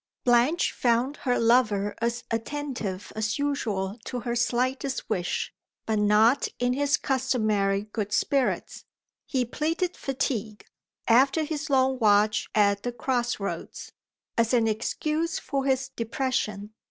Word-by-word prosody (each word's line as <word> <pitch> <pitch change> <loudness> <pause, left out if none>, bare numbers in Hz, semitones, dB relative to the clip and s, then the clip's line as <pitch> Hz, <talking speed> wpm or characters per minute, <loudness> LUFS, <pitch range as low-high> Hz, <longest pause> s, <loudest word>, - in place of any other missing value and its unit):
BLANCHE 245 +8 +3
found 245 +4 +1
her 250 -2 0
lover 215 -4 +3
as 235 +1 -1
attentive 225 -5 -4
as 220 0 -1
usual 225 -8 -2
to 250 -1 -4
her 235 0 -2
slightest 255 +3 -1
wish, 180 -4 -1 0.3
but 220 -1 0
not 215 +5 +4
in 245 0 +1
his 285 +2 +2
customary 215 -7 +1
good 210 -1 -4
spirits. 270 +5 0 0.4
He 255 -3 0
pleaded 325 +8 -1
fatigue, 235 -6 -3 0.4
after 270 +7 +4
his 305 0 -4
long 265 -1 +2
watch 210 -1 +3
at 200 -1 +3
the 245 - -3
cross 240 0 -1
roads, 200 - -5 0.5
as 230 +2 +3
an 230 -2 +3
excuse 305 +9 -1
for 275 -1 -2
his 265 -1 +1
depression. 225 -4 -2
240 Hz, 130 wpm, -26 LUFS, 215-270 Hz, 0.5 s, not